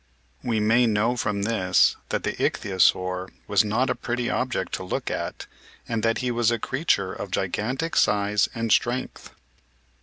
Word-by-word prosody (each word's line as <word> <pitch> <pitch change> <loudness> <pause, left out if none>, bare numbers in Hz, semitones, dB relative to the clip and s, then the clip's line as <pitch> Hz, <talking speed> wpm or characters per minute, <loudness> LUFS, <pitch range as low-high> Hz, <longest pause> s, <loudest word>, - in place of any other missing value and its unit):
We 115 -3 0
may 115 +3 +4
know 110 +3 +1
from 105 -4 -1
this 100 -4 +3
that - - -2
the - - -1
Ichthyosaur 90 -1 +1 0.2
was - - +4
not 110 +5 +1
a - - +2
pretty 120 0 -3
object 125 -7 -2
to - - -3
look 90 - -3
at - - -4 0.4
and 115 -2 -1
that 115 +1 +1
he 125 - +1
was 120 -1 +2
a 120 - +1
creature 115 - 0
of 100 - -6
gigantic 125 - -2
size 105 0 +2
and 115 -1 -2
strength. 120 +4 0
110 Hz, 160 wpm, -25 LUFS, 100-120 Hz, 0.4 s, may